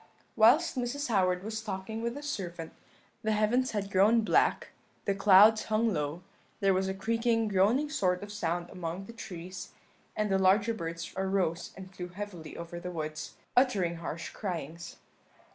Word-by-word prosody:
"Whilst 275 +11 +5
Mrs. 255 +3 -2
Howard 185 -4 +2
was 220 +1 -4
talking 215 +1 -5
with 235 +1 -2
the 290 - -7
servant, 175 - -5 0.5
the 220 0 0
heavens 230 +5 +2
had 200 -2 -3
grown 210 +5 +5
black, 215 - +2 0.4
the 200 - +2
clouds 205 +2 +6
hung 220 0 +1
low; 150 +3 -3 0.4
there 195 -2 +3
was 190 +1 +1
a 190 - -2
creaking, 225 +2 +1
groaning 210 +10 +3
sort 185 -11 0
of 205 - -8
sound 175 -3 -2
among 180 +1 -5
the 230 - -10
trees, 180 -4 -8 0.4
and 210 -1 0
the 190 - +3
larger 200 +4 +4
birds 165 -4 -5
arose 190 -3 0
and 190 0 -10
flew 180 -1 -6
heavily 180 -3 -8
over 170 0 -6
the 180 - -6
woods, 155 -3 -5 0.2
uttering 200 -10 +2
harsh 165 0 -5
cryings. 170 -4 -5
195 Hz, 160 wpm, -30 LUFS, 175-220 Hz, 0.5 s, clouds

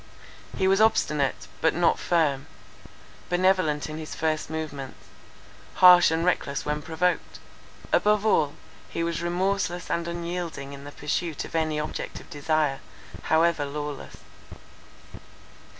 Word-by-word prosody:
He 190 - +2
was 195 +2 +4
obstinate, 150 -10 +2 0.2
but 160 - +3
not 175 0 +2
firm; 150 -6 +1 0.8
benevolent 180 -4 +2
in 155 0 -6
his 155 - -7
first 155 -1 -1
movements; 150 -4 -5 0.8
harsh 180 -1 +8
and 165 +1 0
reckless 140 -6 0
when 150 0 -2
provoked. 165 +3 -1 0.6
Above 210 0 +3
all, 150 -9 +2 0.3
he 165 - -2
was 165 -1 -2
remorseless 180 0 -1
and 170 0 -1
unyielding 170 -4 -5
in 140 0 -10
the 145 - -8
pursuit 150 +2 -3
of - - -12
any 155 -2 0
object 150 - -5
of - - -16
desire, 145 -1 0 0.5
however 160 -1 +3
lawless. 145 0 -6
160 Hz, 125 wpm, -26 LUFS, 150-175 Hz, 0.8 s, harsh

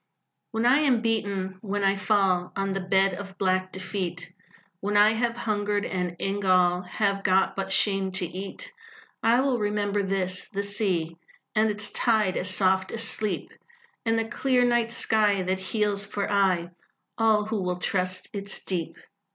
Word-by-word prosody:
When 225 0 -1
I 260 +4 +5
am 260 -7 +2
beaten 200 -4 -1
when 205 -1 -2
I 195 0 +3
fall 195 -3 +1
On 195 0 -1
the 195 - -2
bed 190 +1 +2
of 190 +1 -8
black 185 -1 0
defeat, 185 -2 -5 0.5
When 205 +2 0
I 210 +1 +6
have 235 +1 -1
hungered, 205 -2 -1
and 180 -2 -3
in 195 +3 -2
gall 180 -2 +3
Have 195 +2 -1
got 190 0 +2
but 195 0 -3
shame 195 -1 +1
to 190 -1 +1
eat, 195 - -7 0.5
I 235 +3 +4
will 265 -3 +1
remember 205 -1 0
this 190 -1 -2
the 200 -1 -3
sea, 185 -6 -1 0.4
And 220 0 +3
its 210 0 -2
tide 215 -5 +2
as 185 - 0
soft 190 0 +2
as 230 0 0
sleep, 215 -2 -1 0.5
And 225 -1 +1
the 225 - 0
clear 250 +1 +2
night 240 -1 +1
sky 210 -4 +2
That 185 +1 -1
heals 205 +1 -1
for 200 0 -3
aye 185 -4 +2 0.5
All 220 -2 +3
who 215 -1 -2
will 180 -1 -2
trust 185 0 -2
its 200 -1 -5
Deep. 175 -4 -3
200 Hz, 165 wpm, -26 LUFS, 185-215 Hz, 0.5 s, I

